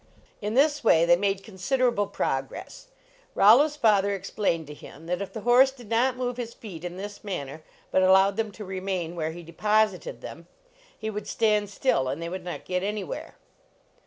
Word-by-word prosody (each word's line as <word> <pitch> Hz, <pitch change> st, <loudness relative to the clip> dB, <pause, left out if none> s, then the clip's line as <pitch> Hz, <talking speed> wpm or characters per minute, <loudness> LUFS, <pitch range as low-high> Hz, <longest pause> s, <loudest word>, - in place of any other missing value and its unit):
In 210 Hz, +2 st, -2 dB
this 295 Hz, +2 st, +3 dB
way 165 Hz, +1 st, +5 dB
they 175 Hz, 0 st, +6 dB
made 195 Hz, +1 st, -1 dB
considerable 230 Hz, +1 st, 0 dB
progress. -, -, -4 dB, 0.5 s
Rollo 225 Hz, +9 st, +7 dB
s 300 Hz, -1 st, -5 dB
father 200 Hz, -7 st, +3 dB
explained 185 Hz, -4 st, -2 dB
to 150 Hz, -, -9 dB
him, 150 Hz, +1 st, -13 dB
that 180 Hz, +3 st, -2 dB
if 200 Hz, -, -5 dB
the 220 Hz, -, -6 dB
horse 245 Hz, +4 st, +6 dB
did 250 Hz, -5 st, -14 dB
not 250 Hz, +3 st, +2 dB
move 250 Hz, -1 st, -2 dB
his 235 Hz, -2 st, -5 dB
feet 180 Hz, -7 st, -10 dB
in 175 Hz, 0 st, -6 dB
this 205 Hz, +1 st, -8 dB
manner, 155 Hz, -7 st, -5 dB, 0.3 s
but 185 Hz, -, +3 dB
allowed 190 Hz, +1 st, +5 dB
them 220 Hz, -1 st, -2 dB
to 210 Hz, -, -8 dB
remain 185 Hz, -3 st, -3 dB
where 160 Hz, -2 st, -2 dB
he 170 Hz, +2 st, -8 dB
de 170 Hz, +1 st, -13 dB
posited 215 Hz, -, +1 dB
them, -, -, -10 dB, 0.5 s
he 220 Hz, 0 st, -4 dB
would 210 Hz, 0 st, -6 dB
stand 210 Hz, -2 st, +1 dB
still, 200 Hz, -, +1 dB
and 135 Hz, +4 st, -3 dB
they 170 Hz, 0 st, -4 dB
would 185 Hz, +1 st, -6 dB
not 175 Hz, -1 st, -6 dB
get 180 Hz, 0 st, -1 dB
anywhere. 210 Hz, -, -4 dB
200 Hz, 190 wpm, -26 LUFS, 180-230 Hz, 0.5 s, Rollo